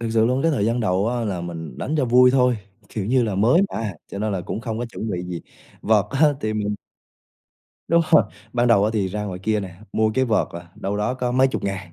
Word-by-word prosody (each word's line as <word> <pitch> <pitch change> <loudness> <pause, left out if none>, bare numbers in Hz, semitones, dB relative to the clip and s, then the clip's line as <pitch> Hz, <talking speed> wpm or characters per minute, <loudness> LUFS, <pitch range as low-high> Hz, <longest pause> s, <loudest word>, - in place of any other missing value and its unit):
Thực 115 -1 -2
sự 110 0 +3
luôn 130 +3 +1
cái 165 - +3
thời 125 -10 0
gian 115 +1 0
đầu 100 -1 +1
á 120 -1 -1
là 95 -4 -2
mình 80 -5 -7
đánh 150 - -2
cho 145 - +2
vui 125 +1 +6
thôi, 125 -2 +3 0.3
kiểu 105 -3 -4
như 130 +2 +3
là 110 -4 -1
mới 120 - +4
mà, 110 -3 -3 0.2
cho 100 - -5
nên 105 0 -1
là 95 - -1
cũng 95 +5 -5
không 115 -1 -4
có 120 - -2
chuẩn 110 -2 -5
bị 90 -1 -2
gì. 90 -1 -5 0.4
Vợt 105 -2 +3
á 145 +3 +4
thì 110 -3 -1
mình 105 -1 -1 1.1
Đúng 170 0 +4
rồi, - - +7 0.3
ban 120 0 +2
đầu 105 -3 +5
á 110 - +2
thì 100 -4 0
ra 105 +2 -3
ngoài 95 -3 -5
kia 110 0 +1
nè, 95 -3 -7 0.2
mua 110 0 +2
cái 130 - +3
vợt 115 -3 +1
là 85 0 -9
đâu 100 +1 -3
đó 105 +4 0
có 125 -1 -2
mấy 130 +1 +4
chục - - -4
ngàn. 95 -3 -4
110 Hz, 260 wpm, -22 LUFS, 100-125 Hz, 1.1 s, rồi